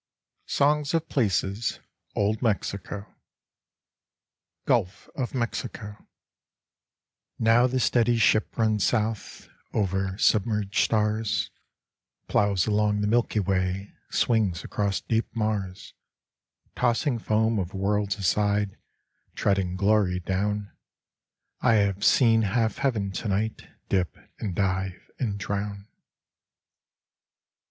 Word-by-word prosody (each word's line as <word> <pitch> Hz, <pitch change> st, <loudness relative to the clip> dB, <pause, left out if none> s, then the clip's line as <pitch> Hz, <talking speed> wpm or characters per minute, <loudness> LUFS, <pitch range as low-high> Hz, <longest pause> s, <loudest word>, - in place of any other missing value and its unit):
71 145 Hz, +2 st, +3 dB
SONGS 145 Hz, +1 st, -4 dB
OF 165 Hz, 0 st, -1 dB
PLACES 105 Hz, -2 st, 0 dB, 0.4 s
(Old 105 Hz, +1 st, +1 dB
Mexico) 100 Hz, -3 st, -2 dB, 1.6 s
Gulf 90 Hz, +2 st, 0 dB
of 130 Hz, 0 st, -3 dB
Mexico 110 Hz, -3 st, -4 dB, 1.3 s
Now 115 Hz, +2 st, +4 dB
the 130 Hz, +1 st, -1 dB
steady 120 Hz, -1 st, +3 dB
ship 110 Hz, -1 st, +2 dB
runs 110 Hz, -3 st, +2 dB
south 110 Hz, -2 st, -1 dB, 0.3 s
Over 95 Hz, -1 st, 0 dB
submerged 105 Hz, -2 st, +2 dB
stars: 110 Hz, 0 st, 0 dB, 0.8 s
Plows 100 Hz, -4 st, +2 dB
along 105 Hz, -1 st, +1 dB
the 105 Hz, -, +1 dB
Milky 115 Hz, 0 st, +2 dB
Way, 95 Hz, 0 st, -1 dB, 0.2 s
Swings 105 Hz, -8 st, +1 dB
across 100 Hz, -2 st, -1 dB
deep 115 Hz, 0 st, 0 dB
Mars, 105 Hz, -4 st, -2 dB, 0.8 s
Tossing 120 Hz, +1 st, +1 dB
foam 110 Hz, 0 st, +1 dB
of 95 Hz, +1 st, -4 dB
worlds 100 Hz, +1 st, 0 dB
aside, 100 Hz, +1 st, +1 dB, 0.6 s
Treading 95 Hz, -3 st, +1 dB
glory 100 Hz, -2 st, +2 dB
down: 100 Hz, +3 st, -2 dB, 0.9 s
I 115 Hz, -, +4 dB
have 100 Hz, -1 st, +1 dB
seen 115 Hz, -2 st, +5 dB
half 110 Hz, +1 st, 0 dB
heaven 110 Hz, -8 st, 0 dB
tonight 105 Hz, +2 st, -2 dB, 0.2 s
Dip 90 Hz, -6 st, 0 dB, 0.2 s
and 95 Hz, -5 st, -3 dB
dive 95 Hz, -1 st, -2 dB
and 105 Hz, -6 st, -1 dB
drown. 100 Hz, 0 st, -4 dB
105 Hz, 100 wpm, -26 LUFS, 100-115 Hz, 1.6 s, seen